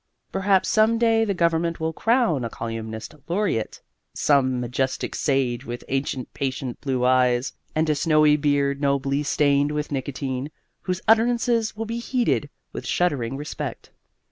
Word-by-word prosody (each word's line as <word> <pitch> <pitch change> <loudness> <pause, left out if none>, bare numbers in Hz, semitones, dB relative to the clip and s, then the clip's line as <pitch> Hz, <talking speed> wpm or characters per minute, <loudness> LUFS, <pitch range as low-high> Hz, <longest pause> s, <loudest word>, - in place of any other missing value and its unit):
Perhaps 195 -1 +2
some 220 +1 +3
day 225 -1 +3
the 200 -3 -1
government 170 0 +1
will 160 0 -1
crown 225 - +2
a 115 - -2
Colyumist 110 0 -6
Laureate, 175 - -1 0.3
some 130 -3 +2
majestic 125 +2 -2
sage 130 -4 0
with 120 -2 -6
ancient 135 -2 -2
patient 130 -2 -4
blue 130 -3 0
eyes 125 0 +2 0.2
and 160 +1 +2
a 155 - +3
snowy 155 0 +4
beard 145 -1 +1
nobly 140 0 +1
stained 145 0 +2
with 150 0 -3
nicotine, 135 0 -3 0.3
whose 185 0 -3
utterances 230 0 +3
will 225 - -3
be 230 +2 -3
heeded 235 - 0 0.2
with - - -6
shuddering 135 -8 0
respect. 145 +1 -6
145 Hz, 145 wpm, -24 LUFS, 130-185 Hz, 0.3 s, snowy